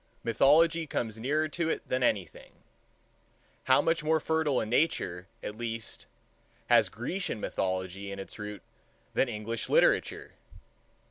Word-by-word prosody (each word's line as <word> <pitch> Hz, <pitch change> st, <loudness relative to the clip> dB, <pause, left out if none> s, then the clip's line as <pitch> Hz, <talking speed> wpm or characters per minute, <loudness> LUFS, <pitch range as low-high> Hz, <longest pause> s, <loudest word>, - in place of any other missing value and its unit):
Mythology 155 Hz, +7 st, +4 dB
comes 115 Hz, -5 st, -3 dB
nearer 150 Hz, +6 st, +1 dB
to 165 Hz, +1 st, -1 dB
it -, -, -3 dB
than 130 Hz, -, 0 dB
anything. 100 Hz, -8 st, -1 dB, 1.1 s
How 130 Hz, +2 st, +5 dB
much 165 Hz, -1 st, +1 dB
more 160 Hz, +1 st, +3 dB
fertile 160 Hz, -4 st, +1 dB
a -, -, -1 dB
Nature, 105 Hz, -, 0 dB, 0.2 s
at 105 Hz, -, -5 dB
least, 115 Hz, -1 st, -5 dB, 0.6 s
has -, -, +5 dB
Grecian 125 Hz, -, -3 dB
mythology 95 Hz, 0 st, -3 dB
its 100 Hz, +1 st, -7 dB
root 105 Hz, 0 st, -6 dB
in -, -, -37 dB
than 135 Hz, -, +2 dB
English 110 Hz, 0 st, -4 dB
literature! -, -, +2 dB
120 Hz, 130 wpm, -29 LUFS, 105-155 Hz, 1.1 s, How